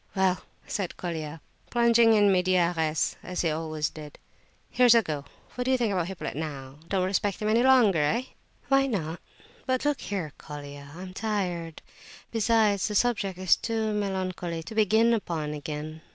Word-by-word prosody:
"Well," 190 -1 +2 0.2
said 195 -4 -4
Colia, 160 -3 -5 0.3
plunging 235 -1 +5
in 205 -2 +5
medias 180 -2 +2
res, 160 -1 0
as 180 - -3
he 165 - +1
always 155 -1 -2
did, 150 -2 -10 0.5
"here's 245 -2 +6
a 230 - +5
go! 150 -4 -4 0.3
What 250 - -3
do - - 0
you 260 - +4
think 230 -5 0
of 175 -3 0
Hippolyte 190 -6 -5
now? 140 -3 -6
Don't 185 -1 +1
respect 195 +1 0
him 210 - -2
any 225 +2 +3
longer, 245 -9 +5
eh?" 210 +12 +1 0.4
"Why 270 +1 +4
not? 170 -8 -3 0.5
But 260 +1 0
look 295 -1 +1
here, 180 -7 -4
Colia, 145 -1 -9
I'm 185 +1 -8
tired; 180 -6 -3 0.5
besides, 220 -3 +2
the 210 - -3
subject 200 -5 +1
is 185 -1 +4
too 220 -2 -2
melancholy 185 -4 -2
to 190 - -8
begin 220 +2 +4
upon 165 -8 -2
again. 150 +1 -6
185 Hz, 165 wpm, -27 LUFS, 160-220 Hz, 0.5 s, here's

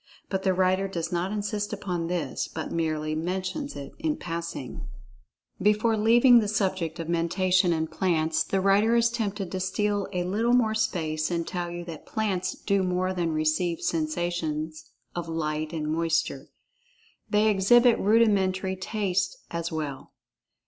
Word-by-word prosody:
But 190 -1 0
the 190 -1 +1
writer 185 +1 +2
does 170 -3 -4
not 175 +2 -1
insist 210 0 -2
upon 180 -5 -3
this, 170 -6 -2
but 160 - -6
merely 155 -2 -1
mentions 185 - -3
it 140 -1 -7
in 310 -2 -1
passing.[Pg 170 -5 -5
39] - - -6 0.8
Before 210 +3 +3
leaving 235 +3 +6
the 215 - 0
subject 190 -5 -1
of 165 - -4
Mentation 180 +2 +2
in 160 -1 +1
plants, 160 -1 0
the 195 - -1
writer 205 +4 +4
is 235 0 +3
tempted 205 -5 -3
to 190 - -2
steal 205 +2 0
a 180 -2 -1
little 220 +7 +1
more 230 -3 +3
space 155 -8 -1
and 170 -1 -2
tell 175 -1 -3
you 175 0 -6
that 165 -3 -9
plants 190 -4 -1
do 200 -1 0
more 185 0 0
than 175 -3 -1
receive 155 +2 0
sensations 155 -1 -2 0.2
of 170 -1 -4
light 155 -1 -2
and 155 -2 -3
moisture. 165 0 0 0.8
They 210 +1 +3
exhibit 235 +4 +5
rudimentary 195 -3 +2
taste 190 -1 -1
as 170 0 -3
well. 150 -4 -5
185 Hz, 155 wpm, -27 LUFS, 165-205 Hz, 0.8 s, leaving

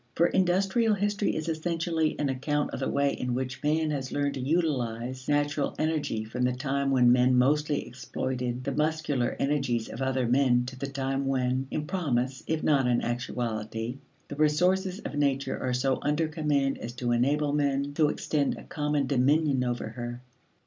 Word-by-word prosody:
For 170 - +4
industrial 195 +5 +2
history 205 +1 0
is 155 +1 -3
essentially 165 0 -1
an 145 - 0
account 145 +3 -1
of - - -5
the 135 - -1
way 140 0 +1
in 125 -1 -2
which 130 0 -3
man 155 +1 +1
has 135 -3 -3
learned 145 -1 0
to - - -5
utilize 130 -5 -1
natural 145 0 +1
energy 155 -8 -1
from 110 +3 -5
the 125 0 +2
time 135 +1 -1
when 125 -3 +5
men 125 +1 +4
mostly 150 +3 +2
exploited 125 0 -4
the 140 - -2
muscular 150 -3 0
energies 135 -5 0
of 120 - -7
other 130 -2 0
men 125 -1 +3
to 130 +1 -7
the 140 +2 -4
time 135 0 -2
when, 130 0 0
in 150 - -3
promise 135 -7 -1
if 160 -1 -1
not 140 -4 +3
in 120 -1 +2
actuality, 120 0 -3 0.3
the - - -6
resources 180 +5 +2
of - - -6
nature 140 -2 0
are 130 - -1
so 130 +1 +1
under 150 +2 +1
command 150 -3 0
as 120 - -6
to 120 -1 -2
enable 145 +5 +2
men 140 -1 0
to 150 0 +3
extend 145 -2 -1
a - - -10
common 150 -1 -1
dominion 140 +1 +2
over 120 -3 -2
her. 120 +1 -6
140 Hz, 175 wpm, -28 LUFS, 125-150 Hz, 0.3 s, when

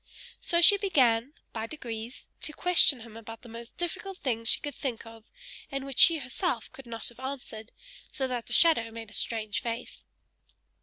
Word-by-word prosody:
So 340 0 +1
she 405 +4 +9
began, 270 - +2 0.2
by 225 0 -4
degrees, 235 -4 -7 0.2
to 305 - -3
question 335 -7 +5
him 225 -1 -12
about 225 +1 -10
the 240 - -12
most 230 +1 -10
difficult 360 +2 -4
things 230 -6 -1
she - - +4
could 290 - -6
think 250 -5 -5
of, 225 -1 -13 0.5
and 275 0 -4
which 275 -1 -6
she 335 -1 +8
herself 265 - -3
could 270 -2 -12
not 230 -1 -5
have 240 - -17
answered; 255 -4 -7 0.4
so 265 -2 -2
that 245 -2 -4
the - - -10
shadow 310 -9 +5
made 225 -1 -9
a - - -14
strange 215 0 -1
face. 230 0 -6
245 Hz, 185 wpm, -28 LUFS, 225-295 Hz, 0.5 s, she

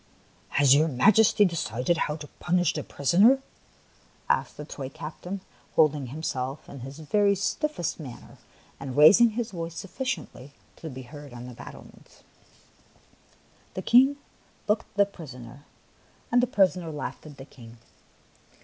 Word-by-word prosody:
" - - -33
Has 140 -2 +6
your 155 +3 +4
Majesty 205 - +4
decided 165 - -1
how 150 - -1
to 150 -1 -9
punish 175 -2 +1
the 150 - -3
prisoner?" 195 - +4 0.9
asked - - 0
the 150 - -7
toy 135 -3 -7
captain, 180 +7 -7 0.3
holding 150 -4 +3
himself 135 -1 -4
in 140 - -10
his 135 +3 -9
very 200 +6 +2
stiffest 200 - -2
manner 130 -6 -11 0.4
and 135 -1 -6
rais 155 +10 +8
ing 235 - +7
his 235 -1 -2
voice 165 -2 -6
sufficiently 185 - -5 0.2
to 160 - -7
be 130 -1 -8
heard 145 +1 -11
on 120 0 -8
the 125 - -9
battlements. - - -14 1.5
The 185 - -4
King 265 +7 +5 0.5
looked 210 +1 0
at - - -31
the 200 - +6
prisoner, 140 -8 -12 0.6
and 245 - +5
the 250 - +1
prisoner 185 -6 +2
laughed 150 +1 -6
at 145 -2 -12
the 135 - -10
King. 120 -4 -15
155 Hz, 150 wpm, -26 LUFS, 135-200 Hz, 1.5 s, rais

